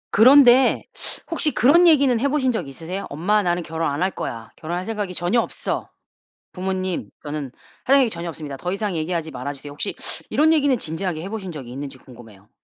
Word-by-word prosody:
그런데 255 +2 +7 0.5
혹시 315 -2 +2
그런 335 +9 +6
얘기는 275 -7 +5
해 275 - +1
보신 270 -3 +1
적 190 - -3
있으세요? 165 +8 -6
"엄마. 190 +9 +1
나는 175 -2 0
결혼 165 0 -2
안 145 +5 -1
할 190 - +1
거야. 115 -9 -6
결혼할 175 +3 -4
생각이 205 -4 -3
전혀 175 +8 +2
없어. - - -4 0.6
부모님. 185 -1 -3
저는 145 -3 -5 0.3
할 275 - +5
이야기 255 -4 +4
전혀 170 -3 -6
없습니다. 150 -4 -7
더 180 +6 -3
이상 200 -3 -2
얘기하지 160 0 -2
말아 135 +2 -5
주세요." 145 +1 -10
혹시 145 - -4 0.3
이런 310 +2 +3
얘기는 285 -5 +3
진지하게 165 -1 -4
해 190 - -6
보신 195 -5 -5
적이 135 -6 -8
있는지 135 +1 -7
궁금해요. 115 -6 -16
180 Hz, 420 characters per minute, -22 LUFS, 150-230 Hz, 0.6 s, 그런데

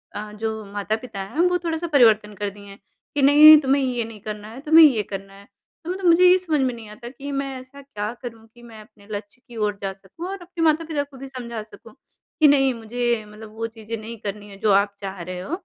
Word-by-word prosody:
अ, 210 0 -6
जो 220 +1 -4
माता-पिता 215 +1 -4
हैं 195 +11 -7
वो 360 0 +1
थोड़ा-सा 335 0 -2
परिवर्तन 220 -5 +4
कर 205 +1 -3
दिए 200 0 -14
हैं 200 0 -12 0.4
कि 290 - +1
नहीं 300 +3 +9
तुम्हें 275 0 +2
ये 250 -2 -1
नहीं 225 -1 -11
करना 210 0 -7
है, 240 - -10
तुम्हें 315 +2 +8
ये 250 -8 +3
करना 195 0 -8
है। 200 +1 -15 0.4
तो 335 - -7
मतलब 375 +1 -4
मुझे 345 +1 +6
ये 365 - +6
समझ 330 -5 -1
में 260 -1 0
नहीं 225 -2 -11
आता 215 +3 -11
कि 275 +2 -8
मैं 275 -1 -3
ऐसा 260 +2 -13
क्या 210 -6 -5
करूँ 230 -3 -9
कि 240 - -17
मैं 225 -2 -12
अपने 205 -1 -20
लक्ष्य 205 +4 -7
की 240 - -13
ओर 210 -2 -1
जा 195 -1 -2
सकूँ 195 - -10
और 390 +1 -5
अपने 350 -1 -5
माता-पिता 315 -2 +1
को 280 -2 -15
भी 270 - -8
समझा 240 -4 -6
सकूँ 215 - -16 0.5
कि 310 - +7
नहीं 270 -2 +4
मुझे 235 0 -2
मतलब 215 +1 -12
वो 225 +1 -3
चीज़ें 225 0 -7
नहीं 225 +1 -8
करनी 205 0 -6
है 195 - -12
जो 215 - +2
आप 200 +1 +2
चाह 195 -2 -6
रहे 180 +1 -6
हो। 185 - -8
230 Hz, 240 wpm, -23 LUFS, 210-280 Hz, 0.5 s, नहीं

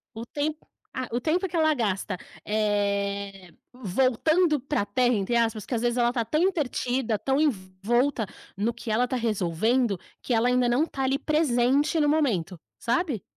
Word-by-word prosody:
O 225 +1 -6
tempo 300 +4 -4 0.3
ah, 255 -1 -3
o 240 - 0
tempo 340 +8 0
que 340 - -6
ela 315 -1 +3
gasta, 205 -6 -1 0.3
eh, 200 -3 -1 0.2
voltando 265 - +2
para 280 0 -1
a - - -2
Terra, 245 +2 +2
entre 205 +3 -1
aspas. 225 -3 +1
Às 235 -3 0
vezes, 240 0 0
ela 240 -1 +3
está 240 -1 -1
tão 305 +7 -1
entretida, 260 - 0
tão 270 +7 0
envolvida 230 0 0 0.3
no 210 +4 0
que 235 -1 -6
ela 235 +4 +2
está 255 - -3
resolvendo, 220 0 0 0.2
que 245 - 0
ela 230 +2 +3
ainda 250 -1 +2
não 245 +5 +3
está 290 -4 -4
ali 265 +1 +1
presente 290 0 +2
no 295 - +3
momento, 220 - 0 0.2
sabe. 240 - -1
240 Hz, 170 wpm, -26 LUFS, 210-280 Hz, 0.3 s, ela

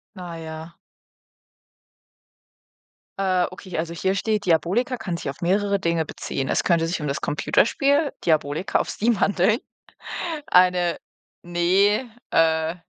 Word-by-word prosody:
Naja. 165 -2 -8 2.4
Äh, 185 -2 +2
okay, 185 -1 -8
also 165 +1 -2
hier 190 +3 0
steht, 210 +1 -1
Diabolika 185 - +1
kann 185 -7 -4
sich 145 - -5
auf 135 - -8
mehrere 200 +3 +1
Dinge 170 -3 0
beziehen. 135 -2 -4
Es - - +1
könnte 165 -1 +2
sich 175 +1 -2
um 150 - -3
das 140 - -2
Computerspiel, 280 - +2
Diabolika 155 +1 +1
auf - - -2
Steam 225 -1 0
handeln. 200 +4 +2 0.9
Eine 180 -1 +4 0.5
ne, 190 +7 +2 0.2
äh, 160 0 +2
180 Hz, 120 wpm, -23 LUFS, 165-200 Hz, 2.4 s, Eine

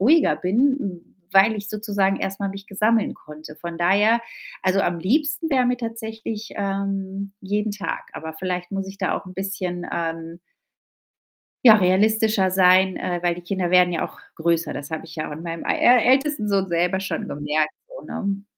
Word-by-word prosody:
ruhiger 295 +10 +4
bin, 205 -2 0 0.3
weil 200 +3 +6
ich 205 0 -6
sozusagen 205 -2 0
erst 195 0 -4
mal 200 - -1
mich 195 +1 -9
ge 195 - -12
sammeln 220 +1 +2
konnte. 150 0 -12
Von 170 -1 -7
daher 205 +6 +4 0.4
also 190 +1 +2
am 175 -3 0
liebsten 295 - 0
wär 260 -3 +3
mir 250 0 +1
tatsächlich, 225 -2 -6
ähm, 195 0 -3
jeden 210 +2 -1
Tag, 205 -1 -5
aber 160 0 -6
vielleicht 180 +1 -4
muss 195 0 -3
ich 195 0 -10
da 185 - 0
auch - - -8
'n 185 - -9
bisschen, 185 -2 -4
ähm 165 0 -4 1.3
ja, 220 -1 +10
realistischer 210 +1 +3
sein, 185 0 +4
äh, 175 -1 -2
weil 175 -1 +2
die 175 - -8
Kinder 180 0 -2
werden 180 -1 +5
ja 170 - -1
auch - - -9 0.2
größer. 165 -1 0
Das 140 +1 -7
habe 160 +1 -5
ich 160 - -12
ja 155 - -3
auch - - -8
an 160 +3 -7
meinem 165 -1 -5
ä 245 -1 +4
ältesten 275 -4 +1
Sohn 195 -2 +1
selber 175 +2 +1
schon 195 - -3
gemerkt 150 +1 -1 0.2
so, - - -11
ne? 200 0 -3
195 Hz, 185 wpm, -23 LUFS, 175-215 Hz, 1.3 s, ja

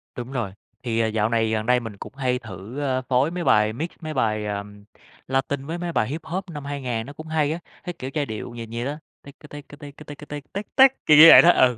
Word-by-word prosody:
Đúng 120 +1 -7
rồi. 120 -7 -3 0.3
Thì, 115 -2 -1
ờ, 115 - +2
dạo 110 0 0
này, 115 -1 +1
gần 110 -1 -1
đây 125 +1 +3
mình 115 -4 -8
cũng - - -10
hay 125 -2 -1
thử, 110 +3 -9
a, 130 -2 0
phối 130 +4 +1
mấy 175 0 -4
bài 105 -6 +3
mix, 160 +9 -4
mấy 155 -1 -5
bài, 110 -5 0
ờm, 105 0 -6 0.4
Latin 135 +1 -1
với 165 +3 -4
mấy 175 0 -4
bài 110 -9 0
Hip-hop 165 +5 -4
năm 145 -3 -7
2000, 130 -5 -3
nó 140 - -10
cũng 155 +2 -10
hay 155 -2 0
á. 165 - -3 0.2
Cái 180 - -5
kiểu 130 - -5
giai 150 -2 -1
điệu 110 0 -6
nhịp 115 -1 -7
vậy 120 +1 -3
đó: 145 +2 -3 0.3
ticka 140 +2 -14
ticka 145 0 -11
ticka 145 +1 -11
ticka 150 0 -10
tick 145 -1 -9
tick 200 +1 -7
tick, 265 0 +5
kiểu 150 - +6
như 155 - +11
vậy - - +11
đó, 175 - +5
ừ. 125 -7 +3
135 Hz, 255 wpm, -23 LUFS, 115-150 Hz, 0.4 s, như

